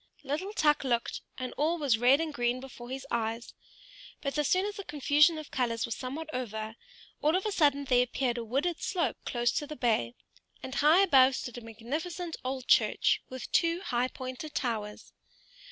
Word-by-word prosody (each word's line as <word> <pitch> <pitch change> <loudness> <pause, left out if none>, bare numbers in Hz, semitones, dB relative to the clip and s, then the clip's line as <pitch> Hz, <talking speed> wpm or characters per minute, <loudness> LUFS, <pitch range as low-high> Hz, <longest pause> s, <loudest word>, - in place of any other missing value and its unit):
Little 300 +9 -3
Tuk 300 -7 +3
looked, 240 -3 -1 0.2
and 255 -1 -4
all 320 +4 +1
was 275 -8 +2
red 255 +4 +5
and 320 -2 -2
green 245 -1 0
before 250 -2 -10
his 265 +1 -5
eyes; 230 0 -2 0.7
but 275 -1 -3
as 295 - +2
soon 370 +2 +2
as 415 0 -4
the 400 - -5
confusion 300 +1 +3
of 310 -1 -8
colors 230 -3 0
was 230 - -4
somewhat 280 +5 -5
over, 220 -3 -4 0.5
all 305 +3 +3
of 375 - 0
a 425 - 0
sudden 285 -6 +2
there 250 -2 +4
appeared 250 0 -1
a - - -4
wooded 280 +9 -1
slope 335 - -1
close 240 -1 +1
to 295 - -2
the 305 - -7
bay, 215 - 0 0.5
and 260 - -6
high 310 +7 +5
up 390 - 0
above 265 -1 +6
stood 245 -1 -5
a - - -15
magnificent 310 - -5
old 260 0 -4
church, - - +3
with 260 0 -7
two 335 +1 +2
high 250 -8 0
pointed 260 +4 -7
towers. 215 -4 -3
265 Hz, 190 wpm, -30 LUFS, 240-310 Hz, 0.7 s, above